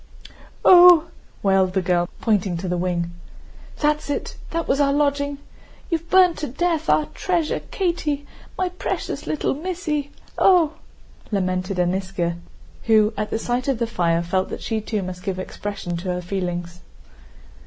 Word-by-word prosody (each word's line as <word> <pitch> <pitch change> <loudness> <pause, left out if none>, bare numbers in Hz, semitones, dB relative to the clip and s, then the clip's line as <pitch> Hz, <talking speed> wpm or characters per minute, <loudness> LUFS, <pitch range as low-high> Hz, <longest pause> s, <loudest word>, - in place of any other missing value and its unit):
"Ooh!" 350 -2 +8 0.3
wailed 190 -2 +3
the 190 - +1
girl, 175 -1 +1
pointing 200 -5 +1
to 185 +2 -4
the 180 - 0
wing. 175 -1 -1 0.7
"That's 300 0 +1
it, 290 - -3
that 335 0 -2
was 275 - +1
our 280 -1 +3
lodging. 285 0 0 0.5
You've 330 0 -2
burned 370 -2 +5
to 300 - -3
death, 325 +4 -1
our 305 - +4
treasure, 345 -4 0
Katie, 315 -6 -1 0.3
my 370 -1 0
precious 365 - -4
little 305 - 0
missy! 310 -2 -3 0.3
Ooh!" 350 -5 +5 0.6
lamented 185 -1 -1
Aníska, 180 -1 -1 0.5
who 220 -1 +4
at 210 0 -3
the - - -1
sight 245 +3 -2
of 270 -3 +1
the 235 - 0
fire 170 -7 0
felt 185 +2 -1
that - - -6
she 220 -1 -1
too 210 -2 -2
must 180 0 -6
give 185 0 -3
expression 185 -1 -5
to 180 +2 -5
her 180 0 -2
feelings. 175 -2 -4
220 Hz, 155 wpm, -22 LUFS, 185-305 Hz, 0.7 s, Ooh